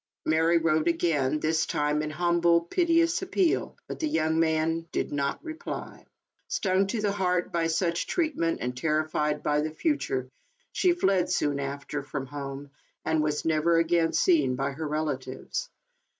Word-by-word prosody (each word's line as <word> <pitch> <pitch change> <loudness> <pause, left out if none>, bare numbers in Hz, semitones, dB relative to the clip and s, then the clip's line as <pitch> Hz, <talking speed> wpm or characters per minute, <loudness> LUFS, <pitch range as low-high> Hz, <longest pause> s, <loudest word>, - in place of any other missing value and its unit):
Mary 160 +2 +3
wrote 160 -1 +2
again, 155 -4 +1
this 160 +1 +1
tiihe 150 0 0
an 155 - -3
humble, 170 +1 +3
piteous 335 - +2
appeal, 380 -2 0
but - - -6
the 315 - 0
young 160 - +1
man 165 0 +1
did - - -2
not 140 -1 -2
reply. 320 -1 -7 0.4
Stung 190 0 +1
to 220 +3 -2
the 205 -1 +1
heart 180 -3 0
by 165 -1 +1
such 170 +1 0
treatment, 300 - 0
and 125 0 -2
terrified 150 +1 0
by 150 0 +2
the 155 - -1
future, 155 - -1 0.4
she 365 - +3
fled, 195 - +1
soon 145 -1 +1
after, 140 +1 -4
from 140 -1 -5
home, 140 0 -7 0.3
and 160 -1 +2
was 150 -1 -1
never 165 +1 +3
again 165 0 +2
seen 145 -8 +3
by 135 +2 -1
her 155 +3 -5
relatives. 150 - -3
160 Hz, 155 wpm, -27 LUFS, 150-175 Hz, 0.4 s, Mary